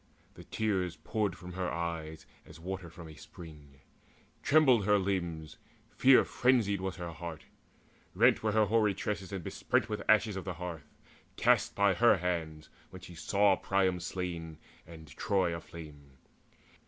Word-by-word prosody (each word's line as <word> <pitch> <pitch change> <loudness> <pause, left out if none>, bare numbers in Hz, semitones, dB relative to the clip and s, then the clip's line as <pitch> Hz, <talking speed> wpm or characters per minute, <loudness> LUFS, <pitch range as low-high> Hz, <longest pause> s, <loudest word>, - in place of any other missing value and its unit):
The - - -13
tears 95 -6 -1
Poured 105 +3 -2
from 90 0 -10
her 90 0 -2
eyes 80 -1 -5 0.2
as - - -14
water 95 0 -6
from 85 0 -11
a 80 - -11
spring; 75 -4 -13 0.6
Trembled 135 -8 +4
her 105 0 +4
limbs, 85 -5 -3 0.3
fear 130 0 +5
frenzied 115 -7 +1
was 95 -1 -3
her 85 -2 -6
heart; 80 0 -8 0.7
Rent - - +4
were 110 -1 0
her 110 -1 +4
hoary 105 -1 +2
tresses 95 -1 -4
and 95 -3 -5
besprent - - -1
With 105 -1 -3
ashes 110 -1 +4
of 95 - -5
the 95 -2 -5
hearth, 85 -3 -7 0.5
cast - - +2
by 100 -1 +3
her 115 +3 +4
hands 80 -4 -3 0.2
When 95 - -12
she 90 - -11
saw 100 +4 +2
Priam 95 -2 0
slain 85 -3 -5 0.3
and 80 -1 -12
Troy 90 +4 -1
aflame. 75 -5 -11
90 Hz, 155 wpm, -31 LUFS, 80-100 Hz, 0.7 s, fear